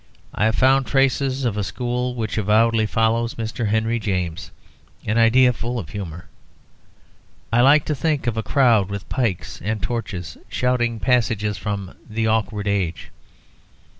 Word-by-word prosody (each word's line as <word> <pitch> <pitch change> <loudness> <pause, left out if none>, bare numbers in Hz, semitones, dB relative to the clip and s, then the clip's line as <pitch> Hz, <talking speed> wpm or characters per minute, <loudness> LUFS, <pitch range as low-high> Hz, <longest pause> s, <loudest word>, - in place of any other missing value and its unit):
I 105 - +1
have 110 0 +2
found 135 -1 +3
traces 135 +1 +1
of 110 -4 -1
a 105 - 0
school 125 +3 -2
which 110 -3 -3
avowedly 110 +2 +3
follows 115 +2 0
Mr. 115 0 -3
Henry 110 +2 0
James: 90 -4 -3 0.6
an 110 +2 +1
idea 125 +2 +5
full 120 +1 -4
of 90 -10 -5
humour. 85 -5 -7 1.3
I 120 - +5
like 140 +3 +5
to 155 - -1
think 150 0 -1
of 120 -2 0
a 110 - -1
crowd 115 -6 +3
with 100 -1 -6
pikes 115 -9 -2
and 110 +2 -1
torches 95 -9 -4
shouting 120 -2 0
passages 105 -3 +1
from 100 -2 -4 0.2
"The 110 +1 -1
Awkward 110 -2 0
Age." 95 -5 -2
115 Hz, 150 wpm, -22 LUFS, 105-125 Hz, 1.3 s, idea